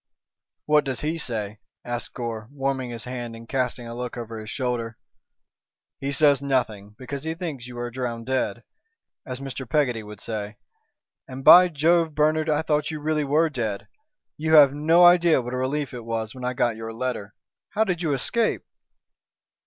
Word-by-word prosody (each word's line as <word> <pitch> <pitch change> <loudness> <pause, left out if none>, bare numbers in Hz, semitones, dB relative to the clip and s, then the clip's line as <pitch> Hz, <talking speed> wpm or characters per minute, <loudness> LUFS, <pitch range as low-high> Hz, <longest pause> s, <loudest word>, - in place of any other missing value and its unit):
"What 150 0 +4
does 130 -4 -3
he 160 +2 -2
say?" 110 -6 -3 0.3
asked 120 0 -4
Gore, 115 -3 -5
warming 135 -2 -2
his 115 -1 -7
hand 120 -2 -6
and 115 0 -12
casting 125 -2 -2
a 115 - -6
look 125 0 -5
over 115 -1 -6
his 110 0 -8
shoulder. 120 -2 -3 1.0
"He 140 +1 -3
says 145 -2 +4
nothing, 110 -7 -1
because 135 +2 -6
he 160 0 -3
thinks 155 -9 -6
you 125 -1 -9
are 120 0 -4
drown 120 -2 -4
dead, 130 +1 -2 0.6
as 125 -1 -5
Mr. 135 -2 -6
Peggotty 130 -7 +1
would 105 -1 -11
say. 105 -1 -5 0.7
And, 130 +1 -8
by 180 +5 +9
Jove! 165 0 +2
Bernard, 155 +1 +2
I 150 +1 +1
thought 150 -2 0
you 155 -1 -4
really 155 0 0
were 150 +4 +3
dead. 110 -7 -3 0.5
You 160 +1 +2
have 140 -3 +8
no 165 +4 +5
idea 175 -3 +6
what 125 0 -5
a - - -1
relief 135 +2 -2
it 120 -2 -7
was 110 -1 -3
when 130 - -10
I 125 0 -2
got 120 -2 +1
your 110 0 -6
letter. 115 -3 -4 0.3
How 220 - +1
did 180 -5 -2
you 160 -4 0
escape?" 220 - 0
130 Hz, 180 wpm, -24 LUFS, 115-150 Hz, 1.0 s, by